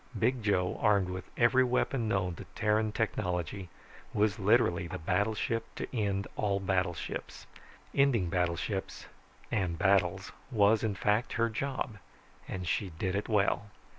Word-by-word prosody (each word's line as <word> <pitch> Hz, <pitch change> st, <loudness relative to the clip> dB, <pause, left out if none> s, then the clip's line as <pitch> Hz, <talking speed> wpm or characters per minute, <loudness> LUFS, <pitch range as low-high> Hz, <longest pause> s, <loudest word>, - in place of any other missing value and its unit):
Big 120 Hz, +3 st, +1 dB
Joe, 95 Hz, -4 st, +1 dB
armed 100 Hz, -3 st, +3 dB
with 90 Hz, 0 st, -6 dB
every 130 Hz, +2 st, +5 dB
weapon 125 Hz, -1 st, 0 dB
known 95 Hz, -4 st, 0 dB
to -, -, -9 dB
Terran 110 Hz, 0 st, +1 dB
technology, 90 Hz, -4 st, -2 dB, 0.5 s
was 105 Hz, +1 st, +2 dB
literally 95 Hz, -4 st, +3 dB
the -, -, -5 dB
battleship 105 Hz, +6 st, 0 dB
to -, -, -4 dB
end 100 Hz, -3 st, 0 dB
all 100 Hz, -2 st, 0 dB
battleships. 95 Hz, -2 st, -2 dB, 0.5 s
Ending 130 Hz, -9 st, +3 dB
battleships 90 Hz, +3 st, -2 dB, 0.5 s
and 90 Hz, -5 st, 0 dB
battles 95 Hz, -1 st, +2 dB, 0.2 s
was, 110 Hz, -3 st, +4 dB
in 105 Hz, -3 st, 0 dB
fact, 105 Hz, +4 st, +1 dB
her 115 Hz, 0 st, +1 dB
job. 130 Hz, -3 st, -3 dB, 0.5 s
And 90 Hz, -2 st, -5 dB
she 95 Hz, +3 st, 0 dB
did 95 Hz, +2 st, -1 dB
it 100 Hz, -, -2 dB
well. 105 Hz, -1 st, +1 dB
100 Hz, 135 wpm, -31 LUFS, 95-110 Hz, 0.5 s, every